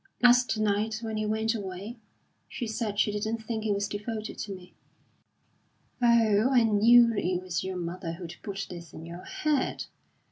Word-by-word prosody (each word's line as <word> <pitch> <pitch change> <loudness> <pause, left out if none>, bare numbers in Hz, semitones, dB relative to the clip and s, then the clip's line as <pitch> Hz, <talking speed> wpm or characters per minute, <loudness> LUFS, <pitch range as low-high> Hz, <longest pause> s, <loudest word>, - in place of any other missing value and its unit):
"Last 245 -1 +5
night, 215 +1 0
when 220 -1 -3
he 215 0 -1
went 220 +1 0
away, 200 +2 -6 0.5
she 245 - -4
said 215 -2 -3
she 210 - +3
didn't 215 +2 -2
think 220 -1 -3
he 215 - 0
was 200 0 0
devoted 215 +1 -5
to 205 - -4
me." 180 -1 -14 1.3
"Oh, 230 -1 +4
I 250 -3 +5
knew 230 +2 +6
it 180 -3 0
was 180 -2 -3
your 190 -1 -4
mother 170 -1 -4
who'd 170 -1 -8
put 195 -2 -4
this 170 -2 -9
in 160 - -9
your 170 +2 -9
head! 305 -8 -1
215 Hz, 170 wpm, -28 LUFS, 190-230 Hz, 1.3 s, knew